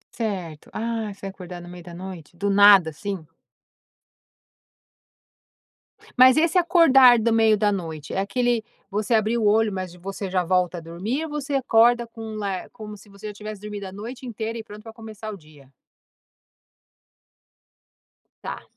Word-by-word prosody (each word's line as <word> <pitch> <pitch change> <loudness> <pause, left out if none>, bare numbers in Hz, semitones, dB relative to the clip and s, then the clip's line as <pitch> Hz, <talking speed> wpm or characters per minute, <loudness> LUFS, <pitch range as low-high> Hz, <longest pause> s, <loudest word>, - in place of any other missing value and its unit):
Certo, 185 -9 -5
ah, 225 -1 -3
você 200 0 -11
acordar 180 -2 -8
no 175 - -11
meio 175 0 -10
da 175 - -11
noite, 175 -2 -10
do 200 - -2
nada 200 -4 +7
assim? 190 +1 -6 2.9
Mas 255 +2 +7
esse 335 +3 +3
acordar 275 -9 +6
do 225 +1 +1
meio 220 -1 +4
da 205 0 +2
noite, 160 -6 -5
é - - -1
aquele, 235 +3 0 0.3
você 210 +3 -1
abriu 225 +1 +2
o - - +3
olho 220 0 +3
mas 185 -2 -5
você 195 +2 -6
já 185 -1 0
volta 180 0 0
a 170 - -7
dormir 195 - -4
ou - - -7
você 290 -1 -4
acorda 240 -2 +3
com 225 -1 -8
lar 200 -3 -4
como 215 -3 -10
se 205 - -18
você 200 +2 -10
já 210 - -6
tivesse 210 0 -8
dormido 210 -1 -7
a - - -9
noite 230 +7 -8
inteira 225 -1 -5
e 225 - -6
pronta 210 0 -12
pra 225 0 -11
começar 220 -1 -9
o 200 - -9
dia? 150 -4 -19 2.7
Tá. - - -6
210 Hz, 165 wpm, -23 LUFS, 185-230 Hz, 2.9 s, nada